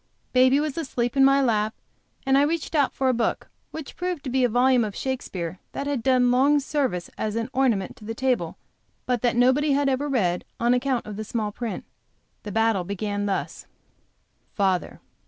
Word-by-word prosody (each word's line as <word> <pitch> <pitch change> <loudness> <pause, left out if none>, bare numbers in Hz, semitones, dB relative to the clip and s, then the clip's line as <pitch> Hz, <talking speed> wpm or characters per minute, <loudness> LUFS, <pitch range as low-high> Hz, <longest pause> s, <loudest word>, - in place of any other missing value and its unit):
Baby 255 +2 +5
was 300 +1 -2
asleep 245 -5 -2
in 270 - +5
my 275 +1 +5
lap 215 -3 +1 0.5
and 270 0 +3
I 275 - +5
reached 320 +3 -1
out 290 -4 +3
for 265 - -1
a 255 - +3
book 235 -1 -2 0.2
which 315 -3 -8
proved 360 -4 -3
to 260 - -4
be 260 0 +2
a 245 - +3
volume 245 +1 +3
of 210 -2 -4
Shakespeare 185 -10 -4
which 280 - -3
had 285 -4 -1
done 250 0 +3
long 280 +4 +4
service 270 - -2
as 215 0 -2
an 230 +2 -3
ornament 245 -8 +1
to 210 - -13
the 225 +1 -5
table, 245 -10 -1 0.5
but 250 -3 0
which 240 -1 +1
nobody 265 +4 +3
ever 280 0 +1
read 185 -10 0 0.2
on 235 +1 +3
account 250 0 0
of 210 -1 -7
the 215 - -3
small 215 -1 -3
print. 230 +1 -5 0.6
The 210 - -7
battle 225 -2 +2
then - - -13
began 205 +1 -2
thus: 195 - -3 0.9
Father. 190 -5 0
250 Hz, 195 wpm, -24 LUFS, 215-270 Hz, 0.9 s, Baby